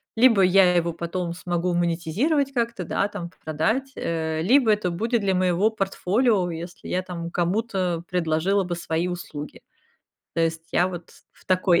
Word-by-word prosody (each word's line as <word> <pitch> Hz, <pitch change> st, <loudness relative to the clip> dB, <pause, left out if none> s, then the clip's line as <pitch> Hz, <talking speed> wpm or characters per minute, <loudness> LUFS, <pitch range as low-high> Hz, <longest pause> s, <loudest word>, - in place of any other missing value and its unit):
либо 230 Hz, -3 st, +5 dB
я 185 Hz, -1 st, +5 dB
его 170 Hz, -1 st, +2 dB
потом 170 Hz, +1 st, -3 dB
смогу 175 Hz, 0 st, -2 dB
монетизировать 180 Hz, -, 0 dB
как-то, 235 Hz, -5 st, -1 dB
да, 195 Hz, -, 0 dB
п 175 Hz, -4 st, -6 dB
продать, 220 Hz, -, -1 dB
э, 160 Hz, -1 st, -2 dB
либо 240 Hz, +3 st, +5 dB
это 205 Hz, -4 st, +1 dB
будет 225 Hz, +7 st, 0 dB
для 195 Hz, -1 st, +1 dB
моего 185 Hz, +2 st, +2 dB
портфолио, 195 Hz, 0 st, +1 dB
если 170 Hz, +2 st, -8 dB
я 185 Hz, -, 0 dB
там 170 Hz, -2 st, -6 dB
кому-то 180 Hz, -2 st, -1 dB
предложила 180 Hz, +3 st, +1 dB
бы 175 Hz, -1 st, -3 dB
свои 170 Hz, 0 st, -2 dB
услуги. 155 Hz, -5 st, -7 dB, 0.7 s
То 165 Hz, -, 0 dB
есть 165 Hz, 0 st, -2 dB
я 180 Hz, -, +3 dB
вот 175 Hz, -2 st, -8 dB, 0.2 s
в -, -, -24 dB
такой 185 Hz, -2 st, +3 dB
180 Hz, 160 wpm, -24 LUFS, 170-205 Hz, 0.7 s, либо